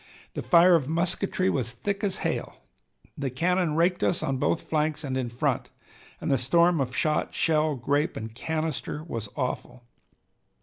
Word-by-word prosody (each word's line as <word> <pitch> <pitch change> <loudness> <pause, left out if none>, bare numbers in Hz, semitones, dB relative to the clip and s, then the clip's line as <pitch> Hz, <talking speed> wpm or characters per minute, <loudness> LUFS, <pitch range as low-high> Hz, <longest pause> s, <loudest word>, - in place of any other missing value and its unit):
The - - -3
fire 175 +1 +6
of 150 -5 +2
musketry 185 +3 0
was 125 - 0
thick 200 - -3
as 195 -2 0
hail. - - -2 0.6
The 140 -2 -2
cannon 170 +4 +1
raked 175 +2 +2
us 170 - +1
on 135 -1 0
both 85 -8 0
flanks 155 0 0
and 135 -2 -3
in 130 -2 -1
front, 120 - -1 0.5
and - - -2
the 135 - +3
storm 170 +5 +3
of 125 -1 -3
shot, 155 -1 0
shell, 155 -2 +2
grape, 145 +7 0
and 110 0 -6
canister 155 +2 -3
was 115 -10 -5
awful. 125 -2 -4
155 Hz, 165 wpm, -27 LUFS, 130-170 Hz, 0.6 s, fire